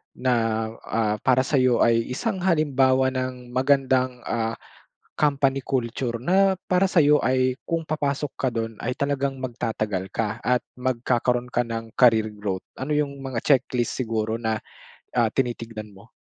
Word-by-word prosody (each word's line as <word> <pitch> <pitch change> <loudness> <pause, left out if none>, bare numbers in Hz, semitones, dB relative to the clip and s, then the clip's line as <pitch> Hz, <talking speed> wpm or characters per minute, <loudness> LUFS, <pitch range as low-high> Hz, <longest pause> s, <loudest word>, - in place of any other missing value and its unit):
na, 115 -3 +1 0.2
ah, 110 -1 0
para 130 0 +4
sa'yo 130 -4 +3
ay 115 0 +3
isang 190 - -2
halimbawa 135 -7 +3
ng 130 -1 -4
magandang, 130 -1 +2
ah, 115 -1 -1 0.7
company 140 -2 +2
culture 120 -2 -2
na 190 +9 +3
para 185 +1 +3
sa'yo 150 -4 +5
ay 130 0 +2
kung 165 -1 -1
papasok 150 -2 -1
ka 130 - +2
dun 115 -1 -3
ay 125 +2 -2
talagang 140 -1 -1
magtatagal 110 -6 -3
ka 110 0 -2
at 125 0 +1 0.2
magkakaro'n 125 -1 0
ka 120 - +2
ng 115 -1 -5
career 110 -3 +4
growth? 100 -3 -4 0.2
Ano 150 +3 -1
yung 140 -2 -1
mga 130 -3 -4
checklist 125 -3 +2
siguro 110 -3 -1
na, 110 -2 -1 0.6
ah, 120 -2 +3
tinitignan 115 -4 -3
mo? 100 +5 -17
125 Hz, 145 wpm, -24 LUFS, 115-135 Hz, 0.7 s, sa'yo